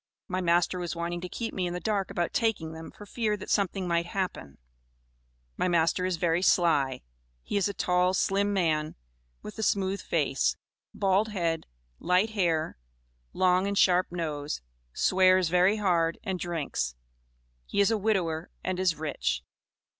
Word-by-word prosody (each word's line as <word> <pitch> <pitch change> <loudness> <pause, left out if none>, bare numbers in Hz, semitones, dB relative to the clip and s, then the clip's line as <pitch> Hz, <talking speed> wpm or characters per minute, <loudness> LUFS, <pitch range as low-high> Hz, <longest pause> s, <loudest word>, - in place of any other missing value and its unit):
My 185 -2 -2
master 175 +1 +2
was 175 -1 -3
wanting 170 +1 -3
to 180 - -6
keep 230 +4 -4
me 185 -2 -1
in 175 - -4
the - - -3
dark 200 +1 -1
about 175 -1 -2
taking 195 -9 0
them, 160 0 -8
for 205 - -12
fear 215 -1 -1
that - - -7
something 195 -2 0
might 170 0 0
happen. 185 - -4 1.0
My - - +1
master 175 +1 +2
is 185 -2 -1
very 170 0 +1
sly; 145 -8 +2 0.4
he - - -4
is 200 -1 +2
a 200 - -3
tall, 180 +1 +2
slim 200 +2 +1
man, 160 -6 0 0.5
with 210 +1 -9
a - - -1
smooth 195 -2 0
face, - - 0 0.3
bald 195 +2 +2
head, 170 -6 -2 0.3
light 185 +5 +2
hair, 165 - 0 0.5
long 185 +1 +2
and 200 0 -1
sharp 180 -1 +4
nose, 150 -4 -3 0.3
swears 185 - +4
very 180 +4 +4
hard, 170 -5 +1
and 190 -2 -3
drinks. 150 - -2 0.7
He - - -2
is 200 +2 +4
a 225 - +2
widower, 180 -6 0
and 185 -1 -2
is 185 -3 +2
rich." 65 - -2
180 Hz, 160 wpm, -28 LUFS, 165-195 Hz, 1.0 s, sharp